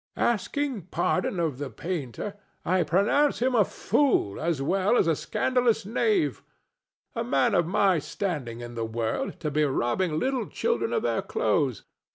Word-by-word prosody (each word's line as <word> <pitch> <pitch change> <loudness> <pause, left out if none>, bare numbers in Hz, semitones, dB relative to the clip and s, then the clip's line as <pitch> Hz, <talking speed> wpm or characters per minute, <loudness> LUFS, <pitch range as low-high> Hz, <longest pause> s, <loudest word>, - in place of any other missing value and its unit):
"Asking 240 - -1
pardon 180 +1 0
of 155 -6 -1
the 145 -2 -4
painter, 165 - -4 0.3
I 185 +1 +2
pronounce 215 - +2
him 255 +2 +1
a 225 -4 +5
fool 225 - +1
as 165 -2 0
well 190 - +2
as - - +4
a 165 -1 +2
scandalous 240 - +1
knave. 335 - +1 0.7
A 230 - -2
man 240 -1 +2
of 170 -2 +2
my 190 -1 +3
standing 140 - -4
in 120 0 -7
the 115 -1 -3
world 110 0 -3
to 150 - -2
be 150 +2 +2
robbing 150 +5 0
little 260 +2 -1
children 470 0 -1
of 460 - 0
their - - 0
clothes! 455 +2 0
185 Hz, 160 wpm, -27 LUFS, 150-240 Hz, 0.7 s, a